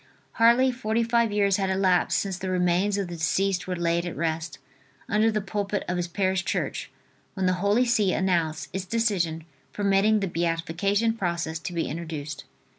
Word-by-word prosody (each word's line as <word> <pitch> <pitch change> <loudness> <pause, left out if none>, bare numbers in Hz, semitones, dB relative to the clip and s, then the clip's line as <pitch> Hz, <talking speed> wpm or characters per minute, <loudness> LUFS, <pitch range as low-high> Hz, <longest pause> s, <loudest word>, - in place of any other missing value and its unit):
Hardly 235 +3 +4
forty 235 -2 -1
five 230 -1 +2
years 200 -2 +2
had 195 -1 0
elapsed 190 -1 +2
since 195 -2 -2
the 185 +1 -5
remains 185 +2 +1
of 200 -2 -2
the 175 -1 -7
deceased 185 +3 0
were 185 - -2
laid 170 0 0
at 175 -4 -5
rest, 160 -1 -2 0.5
under 215 +1 +3
the 215 -1 0
pulpit 200 0 -3
of 180 - -1
his 175 0 -1
parish 190 +1 0
church, - - -2 0.5
when 190 -2 -1
the 185 - +3
Holy 205 +5 +3
See 215 -5 +2
announced 170 -5 0
its 190 0 -3
decision 185 -7 0 0.3
permitting 205 +1 +3
the 195 - -1
beatification 175 +6 0
process 170 -6 -2
to 175 - -6
be 170 - -1
introduced. 155 -3 -6
190 Hz, 175 wpm, -26 LUFS, 170-205 Hz, 0.5 s, Hardly